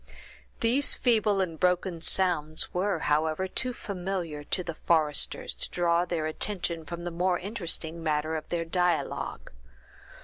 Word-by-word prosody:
These 250 +5 +4
feeble 215 -5 +2
and 165 -4 -3
broken 180 -1 +1
sounds 160 -4 +1
were, 190 +1 +1
however, 155 +4 +1
too 250 +6 -1
familiar 180 -8 -4
to 180 - -1
the 170 - -4
foresters 155 -2 +1
to - - +1
draw 175 0 +2
their 170 -3 -2
attention 170 0 0
from 170 +3 -6
the 175 - -3
more 180 +1 +1
interesting 170 -5 -4
matter 155 0 0
of 155 -1 -5
their 170 -1 -1
dialogue. 180 +1 -1
175 Hz, 140 wpm, -28 LUFS, 160-190 Hz, -, These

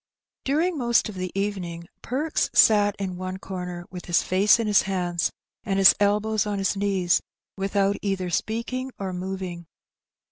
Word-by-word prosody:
Daring 315 +4 +1
most 235 -3 +2
of - - -7
the 185 -1 -4
evening 180 -4 -3 0.2
Perks 295 +6 -1
sat 210 -4 +5
in 190 -2 -4
one 185 0 -5
corner^ 180 -2 -6
with 180 -1 -8
his 175 - +2
face 195 +4 +4
in 230 - 0
his 210 -1 +4
hands^ 180 -3 -1 0.3
and 195 -2 -1
his 195 -1 +8
elbows 210 +1 +1
on 205 -1 -2
his 195 0 +1
knees^ 195 -3 +1 0.3
without 195 +1 0
either 190 -3 -2
speaking 235 +7 -2
or 190 -2 -4
moving. 180 -2 -5
195 Hz, 155 wpm, -25 LUFS, 185-210 Hz, 0.3 s, his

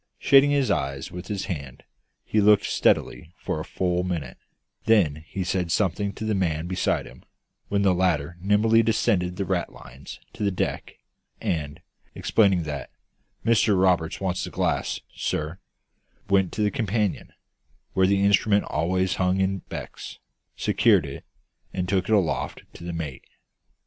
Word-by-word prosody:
Shading 140 +1 +5
his 140 -2 +2
eyes 70 +1 -2
with 90 +2 -8
his 100 -2 -3
hand, 70 -6 -6 0.4
he 110 - +1
looked 105 0 +5
steadily 80 +3 0
for - - -3
a - - -4
full 90 +1 -1
minute; 90 -5 -4 0.5
then 80 -10 +3
he 95 - -3
said 90 -1 -1
something 100 +1 0
to 110 - -6
the 110 - 0
man 85 -5 0
beside 90 +1 0
him, - - -14 0.4
when 100 0 0
the 95 -2 +4
latter 90 -3 0
nimbly 105 +4 +4
descended 105 -5 +1
the 100 - -2
ratlines 70 -8 -5 0.2
to - - -10
the 100 - +2
deck, 95 - -3 0.4
and, 75 0 -3 0.3
explaining 95 -6 +2
that 75 -3 -5 0.6
"Mr 110 -4 +3
Roberts 90 -4 +2
wants 95 -1 -2
the - - -4
glass, - - -1
sir," 80 +4 -3 0.7
went 95 -2 +2
to 105 - -1
the 105 - +2
companion, 105 -5 -1 0.6
where 95 0 +3
the 100 0 +2
instrument 100 +1 +3
always 90 +4 0
hung 95 0 +1
in 95 0 +1
beckets, - - -7 0.4
secured 100 -9 +3
it, 70 -1 -8 0.5
and 90 -1 -2
took 95 0 0
it 110 - +5
aloft 95 -6 -1
to - - -12
the 85 - -4
mate. 80 -6 -6
95 Hz, 155 wpm, -25 LUFS, 85-100 Hz, 0.7 s, Shading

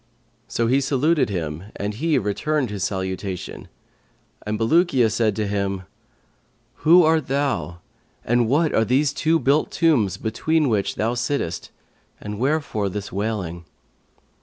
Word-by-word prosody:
So 115 - -1
he 130 +4 +3
saluted 140 +3 +2
him 85 -2 -4
and 105 +1 -3
he 155 +8 +1
returned 125 +5 -1
his 100 -2 -3
salutation, 95 -1 -4 0.8
and 105 0 -1
Bulukiya 130 -1 +3
said 110 0 +1
to 110 - -1
him, 100 -2 -2 0.9
'Who 170 +3 +6
art 160 -2 +2
thou 135 -11 -1 0.4
and 120 0 +2
what 155 +4 +2
are 110 - +3
these 135 +5 +2
two 160 +3 +2
built 145 0 +2
tombs 120 - +2
between 145 +8 0
which 105 -4 0
thou 115 +2 0
sittest, 120 -7 -2 0.5
and 105 0 -6
wherefore 135 -7 0
this 105 +2 -6
wailing?' 95 -5 -3
115 Hz, 135 wpm, -22 LUFS, 100-145 Hz, 0.9 s, Who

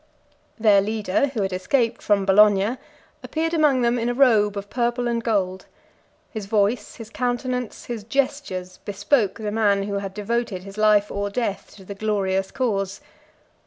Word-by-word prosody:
Their 210 -3 +5
leader, 215 +3 0
who 245 -7 -2
had 190 -1 -2
escaped 230 +5 0
from 200 -2 +2
Bologna, 205 +3 +4 0.4
appeared 325 +1 -2
among 295 -6 +3
them 240 +1 +2
in 230 +1 -1
a 245 - -1
robe 215 -6 +4
of 200 0 -5
purple 240 +1 -1
and 235 -1 -1
gold: 190 -5 -1 0.6
his 215 -4 -6
voice, 210 +1 0
his 225 -1 -10
countenance, 250 -1 -3
his 235 -3 -5
gestures, 230 -8 -2
bespoke 205 +1 0
the 215 -2 -4
man 205 -2 +2
who 200 0 -2
had 195 -1 -6
devoted 215 -2 -2
his 195 +2 -10
life 210 -1 +4
or 200 0 -2
death 200 -3 -3
to 195 - -14
the 200 - -6
glorious 195 -2 -1
cause. 200 -6 -2
210 Hz, 160 wpm, -23 LUFS, 200-240 Hz, 0.6 s, Their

